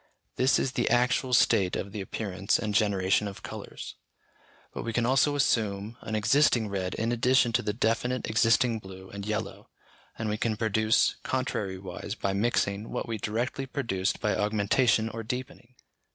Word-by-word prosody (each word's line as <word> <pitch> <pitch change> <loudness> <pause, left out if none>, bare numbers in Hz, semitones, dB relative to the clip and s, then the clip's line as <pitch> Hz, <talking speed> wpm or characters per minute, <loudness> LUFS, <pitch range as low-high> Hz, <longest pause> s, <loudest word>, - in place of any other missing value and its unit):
This 130 +2 +3
is 130 - 0
the 120 -2 0
actual 125 +2 +2
state 100 -6 +3
of 100 - -4
the 105 -1 -5
appearance 100 0 -1
and 105 -2 -3
generation 100 -1 +2
of 100 - -9
colours. - - -8 0.8
But - - -4
we 115 - -4
can 120 +1 +1
also 135 +3 +3
assume 110 -5 0
an 110 - -4
existing 115 0 +3
red 95 -2 -3
in 115 +2 -1
addition 125 0 +3
to 120 - +2
the 105 - -1
definite 115 +3 0
existing 115 +1 +3
blue 95 -1 -11
and 100 0 -7
yellow, 110 +1 -4 0.5
and 110 - -3
we 105 0 -1
can 110 -2 0
produce 110 0 +2
contrariwise, 100 -6 -3
by 100 -4 -2
mixing, 100 -1 0
what - - -3
we 115 -2 -3
directly 120 +5 -2
produced 110 -9 -1
by 105 -2 0
augmentation 110 +2 +2
or 115 0 -5
deepening. 125 +1 -6
110 Hz, 165 wpm, -28 LUFS, 100-120 Hz, 0.8 s, This